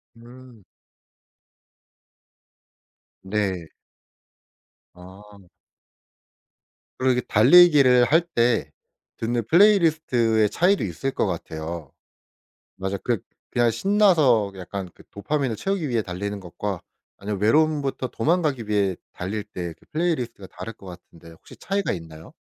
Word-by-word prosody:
음. 120 -1 -15 2.6
네. 95 -4 -2 1.3
아. 95 +2 -15 1.5
그리고 130 0 +2
이렇게 125 -1 -3
달리기를 135 0 +6
할 160 +6 +4
때 120 - 0 0.5
듣는 120 +1 -1
플레이리스트의 155 - +3
차이도 185 - +2
있을 105 +9 -3
것 - - -1
같아요. 80 -3 -6 0.9
맞아. 95 +1 -3
그 120 +3 -1 0.3
그냥 120 -1 +2
신나서 155 - +3
약간 95 +1 -6
그 - - -17
도파민을 125 +3 -2
채우기 195 - -2
위해 120 -3 0
달리는 100 +2 -5
것과 95 +1 -5 0.4
아니면 100 -1 -4
외로움부터 145 +2 +1
도망가기 145 -5 -1
위해 100 -3 +1 0.2
달릴 100 +4 -4
때 90 -5 -7
그 - - -24
플레이리스트가 155 - -2
다를 90 +5 -8
것 100 - -16
같은데 85 -2 -13
혹시 80 - -16
차이가 200 +1 -2
있나요? 80 -1 -9
115 Hz, 260 characters per minute, -23 LUFS, 95-145 Hz, 2.6 s, 달리기를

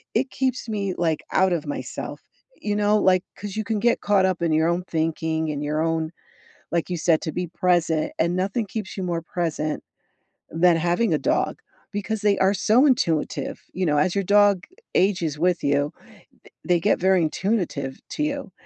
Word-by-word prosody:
it 260 +4 +1
keeps 255 -2 -1
me, 200 -4 -2
like, 165 -3 0
out 190 0 +4
of 160 -3 -2
myself, 145 - -5 0.4
you 210 -1 -2
know, 210 0 +3
like 185 -3 +3
'cause 205 -2 -6
you 220 - -1
can 215 0 -1
get 235 +2 +2
caught 200 -2 +3
up 185 -2 0
in 170 -1 +1
your 160 +1 +3
own 175 +1 0
thinking, 160 0 -1
in 145 -1 -3
your 150 +2 -1
own 160 -1 -1 0.6
like 170 +1 -1
you 180 - -1
said, 160 0 +3
to 160 - -3
be 180 +2 -2
present, 170 -2 +1
and 170 +2 +1
nothing 200 +5 -1
keeps 205 -1 -5
you 190 - -3
more 170 -2 -2
present 160 -3 -2 0.7
than 170 +1 +4
having 175 +7 +1
a - - +3
dog, - - 0 0.3
because 210 +2 -2
they 205 -2 +3
are 190 +1 +4
so 220 +7 +4
intuitive, 170 - 0
you 185 0 -1
know, 150 -1 +2
as 175 +4 +2
your 200 - 0
dog 200 -1 +4 0.3
ages 175 -6 +1
with 180 +1 +1
you, 145 +1 +1 0.5
th - - -18
they 175 -1 +3
get - - +2
very 190 0 +3
intuitive 170 -10 -2
to 300 - -2
you, 285 -7 -3
180 Hz, 190 wpm, -24 LUFS, 160-205 Hz, 0.7 s, out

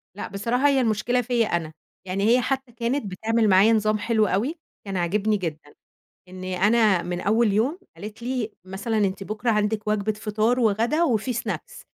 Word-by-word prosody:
لأ 205 - -5
بصراحة 235 +8 0
هي 275 -2 +3
المشكلة 235 +2 +1
فيّا 240 -2 +1
أنا. 160 -2 -2 0.3
يعني 190 +2 -2
هي 250 +1 +5
حتى 265 -1 -2
كانت 235 +2 -2
بتعمِل 220 +3 +1
معايا 195 +4 +6
نظام 215 0 +2
حلو 215 0 +1
أوي، 235 - 0 0.3
كان 195 -2 -3
عاجبني 205 +5 +1
جدًا، 155 -5 -6 0.5
إن 185 0 -10
أنا 195 +1 +2
مِن 175 0 -4
أول 220 +1 +2
يوم 250 - +1 0.2
قالت 210 +2 -9
لي: 245 -3 -2
"مثلًا 195 +4 -3
أنتِ 195 -1 0
بُكرة 215 +4 -1
عندكِ 210 0 0
وجبة 215 0 0
فطار 215 +3 0
وغدا 230 +9 +2
وفي 245 -3 0
snacks. 235 - -5
215 Hz, 170 wpm, -24 LUFS, 195-235 Hz, 0.5 s, معايا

